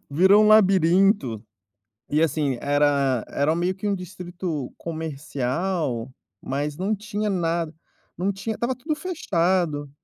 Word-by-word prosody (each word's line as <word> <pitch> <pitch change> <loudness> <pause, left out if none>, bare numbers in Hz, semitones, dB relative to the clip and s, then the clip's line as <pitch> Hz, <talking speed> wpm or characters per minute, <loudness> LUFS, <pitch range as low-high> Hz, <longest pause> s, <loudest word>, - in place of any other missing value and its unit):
Virou 190 +8 +5
um - - +4
labirinto. 190 - +4 0.7
E 150 +2 +2
assim, 145 -4 +1
era 140 -3 +2
era 145 +3 0
meio 175 +2 0
que 200 +2 -4
um 200 - +1
distrito 180 -5 -5
comercial, 150 -3 -3 0.3
mas 145 +2 -3
não 200 +4 0
tinha 210 +1 -3
nada, 170 -3 -1 0.4
não 190 +3 0
tinha 200 +3 -4
estava 240 +4 -1
tudo 300 +5 -3
fechado. 180 - 0
170 Hz, 125 wpm, -24 LUFS, 145-195 Hz, 0.7 s, Virou